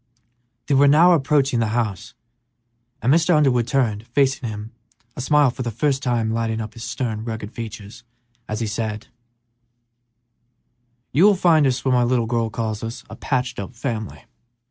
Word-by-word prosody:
They 145 - 0
were 140 +1 +5
now 160 +5 +6
approaching 140 -5 +2
the 115 - +1
house, 110 -7 -3 0.9
and 130 - +4
Mr. 170 +1 +3
Underwood 130 -6 +2
turned, 115 -4 0
facing 135 -1 0
him, 105 +1 -7 0.4
a - - -5
smile 145 0 +3
for 125 - -7
the 120 - -2
first 135 +5 0
time 120 -4 0
lighting 115 -1 -1
up 110 0 -6
his 115 - -9
stern, 115 -3 -3
rugged 110 -2 -6
features, 110 -1 -9 0.5
as 110 +1 -3
he - - 0
said, 110 0 -4 2.0
"You 160 +9 +4
will 205 -1 +6
find 165 -5 +4
us 130 0 -2
what 130 - +2
my 125 - +3
little 120 -1 +1
girl 115 -1 -1
calls 110 +1 -4
a - - -7
'patched 125 -2 -2
up' 100 +5 -7
family. 115 -4 -5
120 Hz, 165 wpm, -21 LUFS, 110-135 Hz, 2.0 s, now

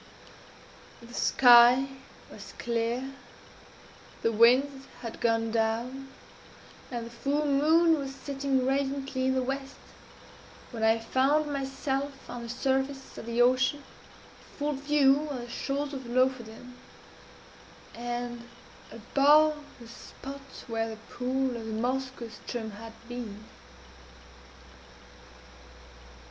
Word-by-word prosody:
The 235 +1 -13
sky 245 +1 +7 0.5
was - - -11
clear, 240 +3 -2 1.1
the 230 - +3
winds 265 +5 +4 0.2
had 230 - -7
gone 225 -1 +1
down, 235 +4 -1 0.8
and 240 -2 -4
the 235 - -10
full 275 +6 -1
moon 315 +3 +4
was 270 -1 -5
setting 275 -1 -1
radiantly 270 -1 -1
in 260 - +2
the 260 - +1
west, 270 +1 -4 1.0
when 230 -3 -6
I 220 0 +4
found 280 +6 +1
myself 270 0 -3
on 245 - -6
the 235 - -7
surface 265 +2 -2
of - - -9
the 235 +1 +3
ocean, 255 +3 +2
in - - -21
full 295 0 -1
view 285 +1 +3
of 265 -4 -4
the 240 - -9
shores 285 +3 -3
of 265 -3 -6
Lofoden, 250 -1 -1 1.2
and 240 0 -5 0.4
above 295 +6 +3 0.2
the 235 - -12
spot 275 +3 -10
where 225 -1 -2
the 220 - -7
pool 255 +1 -1
of 225 -1 -6
the 220 - -4
Moskoe 255 +2 -2
ström 225 -1 -6
_had 225 +1 -10
been. 230 -4 -7
260 Hz, 115 wpm, -28 LUFS, 235-275 Hz, 1.2 s, sky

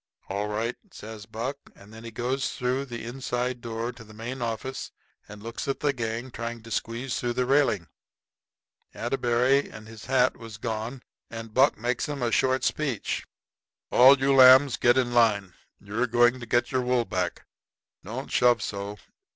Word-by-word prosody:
"All 100 +2 -2
right," 110 +3 -2 0.2
says 105 -4 -10
Buck. 115 +6 -4 0.2
And 100 +2 -16
then 110 +1 -11
he 115 - -7
goes 125 +4 -2
through 125 +2 -1
the 120 -3 -7
inside 125 0 -3
door 115 0 -4
into 120 -2 -10
the 110 -1 -15
main 120 +4 -6
office 120 +3 -4 0.4
and 105 0 -11
looks 115 +3 -5
at 135 - -1
the 145 -1 +2
gang 115 +1 -4
trying 115 -1 -6
to 115 - -12
squeeze 120 +4 -2
through 120 -1 -1
the 125 +1 0
railing. 130 - +2 1.1
Atterbury 125 +2 +1
and 110 0 -11
his 110 -1 -11
hat 130 -1 +2
was 115 -2 -10
gone. 115 +3 -4 0.3
And 115 -1 -8
Buck 135 +4 +4
makes 120 +5 -2
'em 140 -3 -3
a 120 - 0
short 130 +4 +2
speech. 140 -8 -2 0.6
"All 130 +3 +8
you 135 +1 +2
lambs 130 +1 +8
get 120 +1 +3
in 120 -2 +1
line. 105 -6 +3 0.3
You're 105 +5 -2
going 120 +1 +3
to 120 - -8
get 120 +2 +1
your 130 -1 +1
wool 125 -1 +1
back. 90 -4 -3 0.6
Don't - - -6
shove 120 -3 +3
so. 100 +1 -5
120 Hz, 175 wpm, -26 LUFS, 110-130 Hz, 1.1 s, All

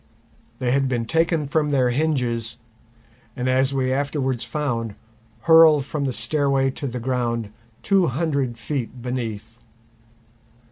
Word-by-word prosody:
They 125 -1 -1
had 135 0 +2
been 120 -3 -1
taken 165 +3 +1
from 150 +1 0
their 130 -3 +2
hinges, 120 -5 -1 0.8
and 125 -1 -2
as 130 +1 +2
we 130 -1 0
afterwards 135 -3 -1
found, 115 -4 -3 0.5
hurled 160 -4 +6
from 145 0 -3
the 135 - 0
stairway 135 +3 +1
to 140 - -5
the 125 0 -4
ground 115 -3 -2 0.3
two 195 -3 +3
hundred 140 -4 -1
feet 125 0 -4
beneath. 115 -3 -5
130 Hz, 130 wpm, -23 LUFS, 120-145 Hz, 0.8 s, hurled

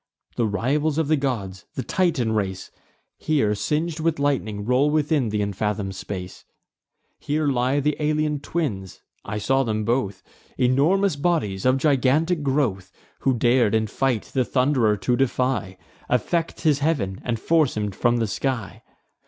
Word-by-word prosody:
The 115 - +1
rivals 140 +9 0
of 160 -2 0
the 155 - +5
gods, 110 -10 -3
the 130 - -3
Titan 160 -11 0
race, 95 -3 -2 0.5
Here, 140 -10 +1
sing'd 150 +10 -1
with 160 0 0
lightning, 120 -8 -1
roll 125 +5 +3
within 150 -4 +1
th' 105 - -4
unfathom'd 100 -1 -2
space. 95 -1 -7 0.8
Here 150 +1 -1
lie 130 0 +1
th' 150 +1 +1
Alaean 150 -1 0
twins, 115 - -4 0.2
(I 105 +1 -4
saw 135 +6 +2
them 110 -4 -1
both,) 105 -5 -1 0.3
Enormous 155 +9 +3
bodies, 140 - 0
of 130 +1 +4
gigantic 150 +4 +2
growth, 130 -10 -1 0.3
Who 135 -2 +1
dar'd 120 -2 +3
in 110 0 +2
fight 120 +1 0
the 130 - +2
Thund'rer 125 -5 +2
to 100 +6 0
defy, 125 -7 0 0.3
Affect 165 +7 0
his 150 -4 +3
heav'n, 135 -12 -1
and 115 -2 -2
force 155 -3 +2
him 105 -1 -1
from 120 +5 +1
the 115 - +1
sky. 115 -3 -3
130 Hz, 150 wpm, -23 LUFS, 105-150 Hz, 0.8 s, the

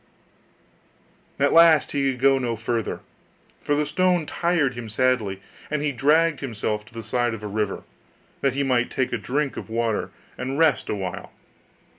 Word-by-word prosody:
At 140 0 +2
last 165 -2 +6
he 140 -1 +1
could 125 - -8
go 135 +1 +4
no 120 -3 -1
farther, 115 0 -3 0.6
for 145 - 0
the 150 +1 +1
stone 180 -1 +1
tired 170 -5 0
him 120 -2 -7
sadly: 110 -4 0 0.3
and 150 -1 -1
he 150 - +1
dragged 150 +4 +3
himself 110 -4 -3
to 110 - -19
the 115 - -6
side 120 +1 0
of 105 - -11
a - - -3
river, 105 -1 -2 0.6
that 135 -2 +1
he 140 - +1
might 125 -2 +1
take 130 -1 -1
a - - +1
drink 135 +7 -2
of - - -7
water, 115 -1 -1 0.3
and 130 +2 -3
rest 155 -7 +2
a - - 0
while. 95 -3 -5
130 Hz, 175 wpm, -24 LUFS, 115-145 Hz, 0.6 s, last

